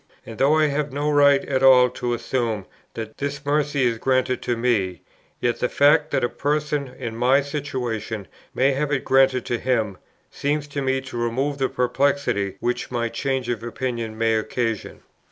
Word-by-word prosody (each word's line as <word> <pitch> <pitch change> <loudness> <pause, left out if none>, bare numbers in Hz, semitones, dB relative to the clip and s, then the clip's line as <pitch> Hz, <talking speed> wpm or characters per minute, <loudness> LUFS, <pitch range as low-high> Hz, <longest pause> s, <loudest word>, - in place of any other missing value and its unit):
And 115 -1 -9
though 140 +3 +4
I 155 - +4
have 145 -1 -1
no 145 +2 -1
right 140 -1 +5
at 130 -1 0
all 130 -1 +7
to 120 -1 -2
assume 115 -4 -2 0.3
that 110 -1 -7
this 145 0 -4
mercy 145 -1 +1
is 115 -2 +1
granted 130 0 +1
to 120 - -1
me, 105 -8 0 0.4
yet 120 -1 0
the 125 - 0
fact, 150 +2 +4
that - - 0
a - - +3
person 150 +1 -1
in 115 -3 -5
my 125 +4 +3
situation 125 - -4 0.3
may 135 +2 +3
have 140 +2 -1
it 140 -3 -1
granted 135 -2 +3
to 120 - -2
him, 110 -6 -1 0.3
seems 145 +1 -2
to 140 0 -3
me 135 0 0
to 130 -2 -8
remove 135 +5 -1
the 130 - +1
perplexity 125 -6 0
which 120 0 -2
my 120 -2 -1
change 130 0 -2
of 120 -3 -2
opinion 115 -2 -4
may 115 0 +2
occasion. 115 0 -3
130 Hz, 180 wpm, -23 LUFS, 115-140 Hz, 0.4 s, all